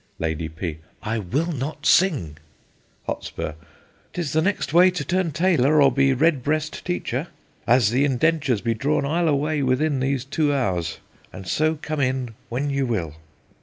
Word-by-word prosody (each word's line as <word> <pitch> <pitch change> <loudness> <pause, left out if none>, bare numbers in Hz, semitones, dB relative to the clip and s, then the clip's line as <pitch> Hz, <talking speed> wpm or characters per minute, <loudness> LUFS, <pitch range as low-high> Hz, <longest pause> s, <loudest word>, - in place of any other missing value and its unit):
Lady 80 0 -2
P. 80 -1 -5 0.2
I 110 +1 -1
will 140 - -1
not 145 +1 -5
sing. 140 - +3 0.7
Hot. - - -4 0.8
'Tis 165 -6 -3
the 160 - +3
next 190 -5 -1
way 180 +2 +7
to 180 -6 -4
turn 185 -1 0
tailor, 155 -3 +3
or 140 -2 +6
be 135 +2 +3
redbreast 150 +2 0
teacher. 165 -4 -2 0.4
An 125 +2 +5
the 130 +4 +2
indentures 135 -3 +1
be 115 -1 0
drawn, 140 +5 0
I'll 165 +4 +1
away 150 0 +1
within 135 +2 +1
these 135 -1 -1
two 145 +1 0
hours; 90 - -1 0.3
and 95 0 -10
so 155 - +1
come 155 0 -3
in 130 -3 -1 0.2
when 140 +4 -2
ye 140 0 0
will. 105 - -1
140 Hz, 160 wpm, -23 LUFS, 120-155 Hz, 0.8 s, way